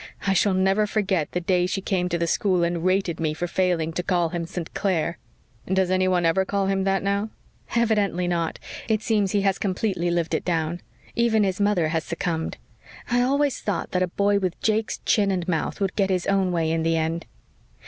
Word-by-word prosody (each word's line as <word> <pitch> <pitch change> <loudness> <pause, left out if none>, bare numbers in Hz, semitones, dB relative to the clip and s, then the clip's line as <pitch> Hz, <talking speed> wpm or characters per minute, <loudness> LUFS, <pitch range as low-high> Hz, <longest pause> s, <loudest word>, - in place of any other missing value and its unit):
I 195 - +3
shall 195 +1 +3
never 195 +3 +2
forget 195 -7 0
the 180 - -1
day 180 0 +1
she 195 - -2
came 185 -2 -1
to 170 - 0
the 170 - 0
school 180 +1 +1
and 170 -1 -1
rated 185 -2 +1
me 155 -2 -1
for 175 - -2
failing 175 -2 0
to 180 - -1
call 175 -2 +1
him 170 0 -4
St. 175 -2 -6
Clair." 170 -4 -1 0.5
"Does 190 -1 +2
anyone 185 -1 +2
ever 165 +3 +3
call 200 +1 -1
him 195 0 0
that 195 -1 +1
now?" 200 +2 0 0.5
"Evidently 205 -6 +1
not. 170 -2 -1 0.3
It 220 -1 0
seems 210 -4 +1
that - - +1
he - - +2
has 195 -1 +1
completely 185 -2 -1
lived 170 -1 -1
it - - 0
down. 165 0 -1 0.3
Even 230 -2 +3
his 190 0 -1
mother 195 -6 +2
has 160 -1 -1
succumbed. 165 -1 -3 0.5
I 245 0 +3
always 280 +1 +1
thought 205 -4 -2
that 180 - 0
a 185 - +2
boy 200 +3 +1
with 185 -3 -2
Jake's 220 0 0
chin 205 -2 +3
and 180 -3 -1
mouth 165 +2 -1
would 195 -2 -1
get 195 -2 +1
his 185 -2 0
own 195 -2 +2
way 165 -2 0
in 165 0 0
the 165 0 +1
end. 160 +1 -2
185 Hz, 210 wpm, -24 LUFS, 170-200 Hz, 0.5 s, I